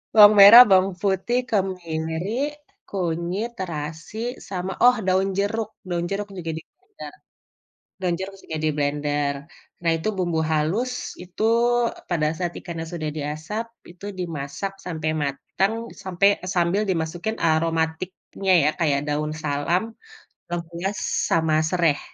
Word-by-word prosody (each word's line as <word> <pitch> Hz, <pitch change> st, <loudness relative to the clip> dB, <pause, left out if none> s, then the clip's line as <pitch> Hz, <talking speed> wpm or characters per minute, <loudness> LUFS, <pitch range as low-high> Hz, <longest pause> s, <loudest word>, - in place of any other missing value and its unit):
Bawang 210 Hz, 0 st, +10 dB
merah, 205 Hz, +5 st, +12 dB
bawang 190 Hz, 0 st, +5 dB
putih, 200 Hz, +5 st, +1 dB
kemiri, 185 Hz, -, -2 dB, 0.4 s
kunyit, 180 Hz, +4 st, -2 dB
terasi, 160 Hz, +2 st, -5 dB, 0.3 s
sama, 185 Hz, 0 st, -3 dB
oh, 250 Hz, 0 st, +7 dB
daun 190 Hz, +1 st, +2 dB
jeruk. 215 Hz, +2 st, -1 dB, 0.2 s
Daun 175 Hz, -1 st, -1 dB
jeruk 205 Hz, +1 st, -3 dB
juga 175 Hz, -4 st, -5 dB
diblender 380 Hz, -, -12 dB, 0.9 s
daun 180 Hz, -2 st, 0 dB
jeruk 195 Hz, +1 st, -5 dB
juga 160 Hz, -1 st, -5 dB
diblender. 145 Hz, -1 st, 0 dB, 0.5 s
Nah 170 Hz, -, +2 dB
itu 165 Hz, +7 st, -3 dB
bumbu 175 Hz, -3 st, 0 dB
halus 185 Hz, +12 st, 0 dB, 0.3 s
itu, 180 Hz, +3 st, -7 dB, 0.5 s
eee, -, -, -15 dB
pada 155 Hz, -3 st, +1 dB
saat 175 Hz, -1 st, -1 dB
ikannya 170 Hz, -2 st, -6 dB
sudah 155 Hz, -3 st, -4 dB
diasap, 155 Hz, +10 st, -4 dB, 0.2 s
itu 180 Hz, +3 st, -11 dB
dimasak 165 Hz, +2 st, -4 dB
sampai 160 Hz, -3 st, -2 dB
matang 170 Hz, +9 st, -1 dB, 0.3 s
sampai 185 Hz, +1 st, +3 dB
eee, 185 Hz, -, -4 dB
sambil 175 Hz, +4 st, +2 dB
dimasukin 175 Hz, +5 st, -2 dB
aromatiknya 165 Hz, +4 st, 0 dB
ya, 150 Hz, -, +4 dB
kayak 145 Hz, -5 st, +2 dB
daun 150 Hz, +1 st, -1 dB
salam, 145 Hz, +5 st, 0 dB, 0.7 s
lengkuas, 175 Hz, +3 st, -4 dB, 0.3 s
sama 160 Hz, -1 st, +2 dB
sereh. 170 Hz, -5 st, +2 dB
175 Hz, 125 wpm, -23 LUFS, 160-195 Hz, 0.9 s, merah